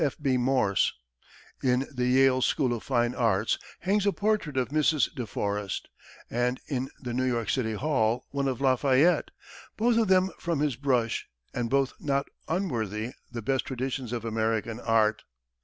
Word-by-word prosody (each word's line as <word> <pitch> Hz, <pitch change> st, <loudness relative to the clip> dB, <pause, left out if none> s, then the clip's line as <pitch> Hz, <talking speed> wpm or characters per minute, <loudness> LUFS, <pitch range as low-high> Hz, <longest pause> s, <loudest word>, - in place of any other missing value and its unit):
F. 140 Hz, -, -1 dB
B. 135 Hz, -3 st, +1 dB
Morse. 125 Hz, -5 st, +2 dB, 0.7 s
In 130 Hz, +1 st, +2 dB
the 125 Hz, -1 st, 0 dB
Yale 130 Hz, 0 st, +4 dB
School 130 Hz, -2 st, +2 dB
of 115 Hz, -, -4 dB
Fine 120 Hz, -2 st, +1 dB
Arts 115 Hz, -7 st, +1 dB, 0.2 s
hangs 200 Hz, +2 st, +1 dB
a -, -, +5 dB
portrait 205 Hz, -9 st, 0 dB
of 125 Hz, -3 st, +1 dB
Mrs. 155 Hz, 0 st, +2 dB
De 125 Hz, -4 st, -5 dB
Forest, 100 Hz, -1 st, -3 dB, 0.4 s
and 125 Hz, +2 st, 0 dB
in 135 Hz, -2 st, -2 dB
the 120 Hz, -3 st, -5 dB
New 130 Hz, +2 st, 0 dB
York 120 Hz, -3 st, 0 dB
City 115 Hz, -4 st, 0 dB
Hall 125 Hz, -2 st, 0 dB
one 140 Hz, -1 st, -1 dB
of 130 Hz, -3 st, -2 dB
Lafayette, 135 Hz, +5 st, +3 dB, 0.5 s
both 230 Hz, +1 st, +3 dB
of 225 Hz, -, +2 dB
them 185 Hz, 0 st, +4 dB
from 170 Hz, -4 st, -1 dB
his 145 Hz, -4 st, +1 dB
brush, 125 Hz, -4 st, 0 dB, 0.3 s
and 120 Hz, -2 st, -2 dB
both 135 Hz, 0 st, +2 dB
not 140 Hz, -1 st, 0 dB, 0.2 s
unworthy 120 Hz, -, -2 dB, 0.2 s
the 120 Hz, -2 st, -5 dB
best 135 Hz, +3 st, 0 dB
traditions 130 Hz, -1 st, -3 dB
of 120 Hz, -2 st, -3 dB
American 110 Hz, 0 st, -1 dB
art. 110 Hz, -2 st, +2 dB
130 Hz, 165 wpm, -28 LUFS, 115-140 Hz, 0.7 s, a